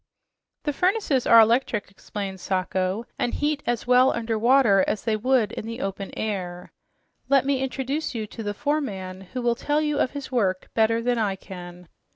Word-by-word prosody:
"The 295 - -1
furnaces 360 - +1
are 230 - +8
electric," 225 -2 +2
explained 195 -1 -6
Sacho, 185 +3 -1
"and 240 - 0
heat 295 0 0
as 240 -1 -1
well 250 +1 +5
under 230 -1 -2
water 225 -4 +4
as 215 - -1
they 220 -1 +1
would 230 -1 +2
in 220 - -6
the 230 +2 -5
open 195 0 -4
air. 180 -5 -4 0.6
Let 275 -1 +4
me 275 -1 +1
introduce 265 +2 -2
you 220 -2 -2
to 220 - -9
the 205 -1 -3
foreman, 200 -11 -2
who 250 - -2
will 240 -1 +3
tell 290 +5 0
you 300 -1 0
of - - +2
his 285 -2 -6
work 190 -7 0
better 225 +1 +2
than 245 -1 +1
I 205 -3 0
can." 180 -2 -10
230 Hz, 185 wpm, -25 LUFS, 195-265 Hz, 0.6 s, are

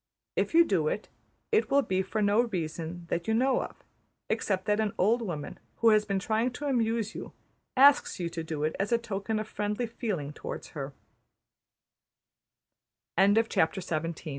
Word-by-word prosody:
If - - 0
you 335 0 +8
do 170 - +1
it, 210 - -2 0.4
it 440 0 +3
will 280 0 +4
be 190 -4 0
for 210 +3 -2
no 205 +3 +4
reason 170 -3 -4
that 170 0 -1
you 220 - +2
know 260 +3 +3
of, - - -8 0.5
except 190 -2 0
that 210 0 +2
an 215 -2 0
old 225 +6 +3
woman 165 -9 -5 0.2
who 230 - +4
has 215 -1 +4
been 200 -2 -1
trying 220 +5 +1
to 290 - -6
amuse 230 -4 0
you - - -8 0.4
asks 280 -4 +6
you 175 - -1
to 165 -1 -5
do 155 -2 -4
it 155 - 0
as 200 +3 -1
a 235 - +5
token 220 -1 -3
of 215 0 -3
friendly 210 +3 -2
feeling 205 - -4
towards - - -7
210 Hz, 160 wpm, -29 LUFS, 180-230 Hz, 0.5 s, you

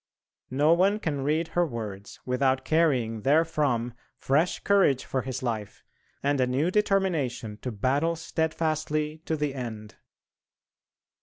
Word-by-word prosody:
No 145 +5 +4
one 195 +4 +3
can 145 -8 -2
read 155 +3 0
her 175 - +2
words 105 - -6
without 130 +1 +1
carrying 130 -9 +1
therefrom 140 -4 +1 0.2
fresh 155 +6 +1
courage 190 -10 +3
for 130 - -1
his 130 0 -5
life, 110 -4 -4 0.4
and 140 -1 +2
a 125 - +2
new 140 +8 +1
determination 175 - 0
to 125 - -3
battle 140 +10 +1
steadfastly 155 -1 -1
to 160 - -1
the 150 -2 -1
end. 110 -5 -7
140 Hz, 130 wpm, -27 LUFS, 125-160 Hz, 0.4 s, No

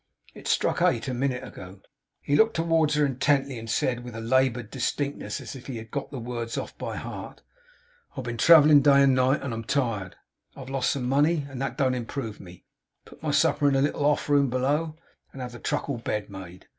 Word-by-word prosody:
'It - - -10
struck - - +1
eight - - +2
a 130 - -2
minute 125 0 -1
ago.' 95 +1 -10 0.4
He 145 - 0
looked 220 +7 +4
towards 165 -2 +2
her 150 -1 +3
intently; 135 -1 0
and 115 0 -9
said, 120 +2 0
with 120 -2 -9
a - - -5
laboured 120 -1 +1
distinctness, 140 +2 -3
as - - -8
if 130 - -11
he 130 -4 -5
had 110 0 -10
got 140 - -4
the 140 - -7
words 115 -1 -5
off - - -5
by - - -4
heart: - - -8
'I - - -34
have 130 - -5
been 120 -1 -5
travelling 150 +1 +7
day 140 0 +6
and 135 -1 +5
night, 130 +2 +2
and 135 -4 -3
am 115 0 -4
tired. 115 -8 -1 0.4
I - - -10
have 130 0 -9
lost 135 -2 0
some 125 -3 -1
money, 145 +3 +2
and 135 -2 -7
that 135 -1 -3
don't 130 -3 +2
improve 120 -2 -5
me. 90 -2 -13 0.4
Put - - -16
my - - -2
supper 145 - +3
in 140 - +3
the 135 - +3
little 145 0 -1
off 145 0 +2
room 140 -2 +3
below, 145 +6 0 0.4
and 135 - -10
have 125 -1 -5
the 120 - -10
truckle 140 -3 -2
bed 105 -2 -3
made. 95 -2 -10
135 Hz, 220 wpm, -26 LUFS, 120-145 Hz, 0.4 s, travelling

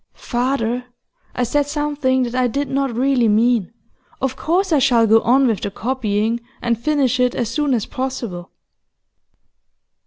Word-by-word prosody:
'Father, 245 -1 -2 0.5
I 250 - 0
said 285 +4 0
something 290 -3 0
that 240 -1 -4
I 255 0 +2
did 280 +3 -2
not 275 -1 0
really 260 -2 +2
mean. 220 -1 +2 0.5
Of 265 0 -2
course 355 +4 0
I 300 - +4
shall 240 -3 +4
go 225 +1 +5
on 265 +3 +3
with 225 -5 0
the - - -2
copying 225 0 -1 0.2
and 235 -1 0
finish 275 -5 +1
it 250 -1 +2
as 235 -3 -1
soon 290 -1 0
as 225 - -2
possible. 240 -9 -5
250 Hz, 155 wpm, -19 LUFS, 230-275 Hz, 0.5 s, go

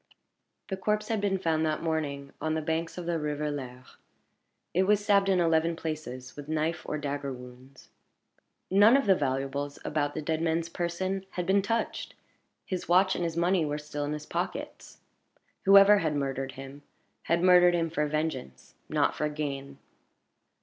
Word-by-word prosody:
The 190 - -2
corpse 210 +2 -1
had 220 -3 0
been 195 -1 +1
found 160 -4 0
that 155 0 -1
morning 145 -4 -2
on 155 0 0
the 160 - -1
banks 165 +2 -2
of 180 - -5
the 170 -1 -1
river 150 0 -2
Lers. 130 -3 -8 0.8
It 185 +2 +2
was 210 0 +3
stabbed 200 -1 +3
in 190 -2 +3
eleven 165 0 +2
places 155 -6 -6
with 145 0 -9
knife 155 +1 -1
or 150 - -1
dagger 140 -1 -3
wounds. 125 +1 -12 0.8
None 205 +6 +7
of 275 - 0
the 195 - +6
valuables 140 -1 -2
about 145 -1 -1
the 155 - -2
dead 160 +1 -1
man's 165 0 0
person 185 +3 -3
had 180 - -2
been 195 +2 +3
touched; 225 +4 -2 0.5
his 185 -2 -4
watch 185 +2 +5
and 175 - -2
his 165 -1 -2
money 175 0 +2
were 150 -1 -2
still 150 -1 -5
in 145 +1 -2
his 150 0 -6
pockets. - - -5 0.7
Whoever 200 +1 +8
had 155 -4 -1
murdered 135 -1 -2
him, 135 +2 -10 0.4
had 170 +1 +1
murdered 180 -1 +6
him 165 -1 0
for 150 -2 0
vengeance, 150 - -4 0.2
not - - +2
for 150 +1 -1
gain. 140 -2 -5
160 Hz, 170 wpm, -28 LUFS, 145-180 Hz, 0.8 s, Whoever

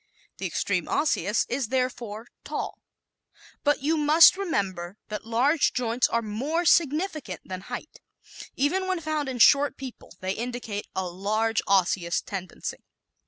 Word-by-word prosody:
The - - -2
extreme - - -1
Osseous 220 - +1
is 250 -1 -1
therefore 240 -3 -2 0.2
tall. - - -4 0.8
But 290 -2 +2
you 315 +3 +2
must 305 +4 +7
remember 195 - -2
that 215 +1 -6
large 265 +7 +2
joints 245 0 +1
are 230 0 0
more 275 +11 -2
significant 310 - +1
than 185 -1 -6
height. 245 +9 -8 0.6
Even 370 +8 +1
when 375 -2 0
found 310 -3 -2
in 255 - -4
short 280 +5 +5
people 265 -3 -9
they 185 0 -2
indicate 235 -3 -4
a 190 -1 -1
large 215 +5 0
osseous 180 -3 +2
tendency. 185 -3 -6
245 Hz, 135 wpm, -26 LUFS, 205-295 Hz, 0.8 s, must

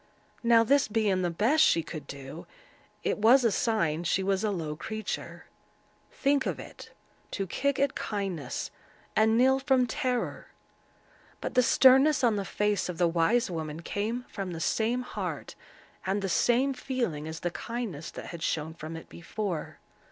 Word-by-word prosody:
Now 235 -1 +5
this 280 +4 +3
being 210 -4 +1
the 175 - +1
best 230 - +3
she 165 - +4
could 155 -4 -8
do, 140 +4 -9 0.6
it - - 0
was 240 +5 +6
a 230 - +3
sign 170 -8 0
she 185 +2 +1
was 195 +1 0
a 215 - +1
low 160 -6 -3
creature. 220 +6 -5 0.7
Think 280 0 +1
of - - -2
it—to 195 - -9
kick 280 +9 -1
at 280 0 +1
kindness, 190 - -4 0.4
and 220 +1 +4
kneel 265 +2 +4
from 265 -2 +3
terror. 250 0 -2 0.9
But - - -4
the 250 - +5
sternness 265 +3 +5
on 230 -3 +4
the 200 -1 -2
face 210 -2 0
of 175 - -4
the 175 - +3
wise 175 +7 +2
woman 160 -1 -5
came 220 +7 -2
from 195 -3 -5
the 165 - -5
same 230 +8 0
heart - - -5 0.5
and 195 +2 -1
the 195 - -1
same 250 +8 +3
feeling 240 - -3
as 160 +1 -6
the 175 - -1
kindness 220 -9 -5
that - - -8
had 170 -2 -8
shone 160 0 -1
from 160 0 -7
it 160 - -11
before. 170 -1 -5
210 Hz, 165 wpm, -28 LUFS, 170-245 Hz, 0.9 s, was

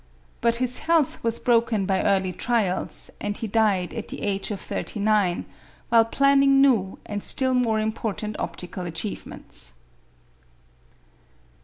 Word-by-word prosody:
But 235 0 +2
his 250 +1 +2
health 325 -4 +1
was 230 0 +1
broken 230 -4 +1
by 190 0 +1
early 190 -2 +1
trials, 210 -4 -1
and 205 0 -2
he - - -4
died 205 -4 +1
at 225 -3 -5
the - - -6
age 195 -1 -2
of 205 -3 -4
thirty 210 - -5
nine, 205 -4 +1 0.4
while 230 -1 +5
planning 275 +2 +4
new 230 -9 +3
and 205 -1 -4
still 260 +4 +4
more 235 -3 +1
important 215 -1 -3
optical 180 0 -5
achievements. 160 - -6
215 Hz, 135 wpm, -24 LUFS, 195-235 Hz, 0.4 s, while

